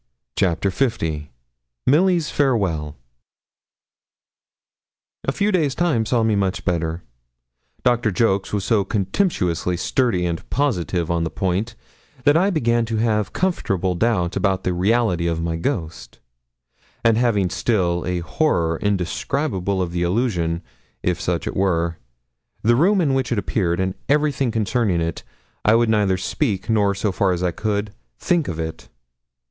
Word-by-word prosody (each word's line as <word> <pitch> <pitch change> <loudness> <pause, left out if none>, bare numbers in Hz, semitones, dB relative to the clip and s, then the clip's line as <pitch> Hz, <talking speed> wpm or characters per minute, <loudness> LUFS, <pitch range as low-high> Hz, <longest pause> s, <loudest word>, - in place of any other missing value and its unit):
CHAPTER 95 0 +1
L 80 - -1 0.7
MILLY'S 170 +2 +3
FAREWELL 95 - 0 2.3
A - - +1
few 205 +1 0
days' 155 -8 +1
time 150 -11 +1
saw 120 -3 +2
me 110 -1 +2
much 100 0 -1
better. 85 -2 -1 0.8
Doctor 120 -2 +2
Jolks 100 -1 +1
was 105 -2 -1
so 110 -4 +2
contemptuously 95 - 0
sturdy 110 - +1
and 85 -2 -4
positive 90 - 0
on 85 -1 +1
the 80 - -1
point, 95 +7 -2 0.5
that 145 - +5
I 185 +5 +4
began 120 -9 +1
to 110 0 -2
have 110 -2 +1
comfortable 95 - 0
doubts 90 -3 0
about 95 -2 0
the 90 - 0
reality 95 -2 +1
of 85 -1 -1
my 85 0 -1
ghost; 85 - -4 0.9
and 115 -1 +5
having 105 -6 +1
still 90 -7 0
a 90 -1 -1
horror 85 - 0
indescribable 100 - -1
of 85 - -4
the 85 0 -2
illusion, 85 -4 0 0.4
if 90 -1 0
such 85 -3 -1
it - - -4
were, 85 -3 0 0.6
the 120 +2 +4
room 190 - +3
in 145 -5 +2
which 130 -1 0
it 120 - +1
appeared, 90 -4 0
and 95 0 0 0.2
everything 145 -3 +2
concerning 110 -4 0
it, 85 0 -2 0.4
I 110 - +5
would 115 0 +3
neither 105 -4 +2
speak, 100 - -1
nor, 100 -2 +2
so 100 +1 -1
far 95 0 +1
as 90 0 -3
I 90 - +1
could, 105 +2 -2 0.2
think 175 -4 +1
of 85 -2 -4
it. 80 0 -5
100 Hz, 145 wpm, -21 LUFS, 90-120 Hz, 2.3 s, that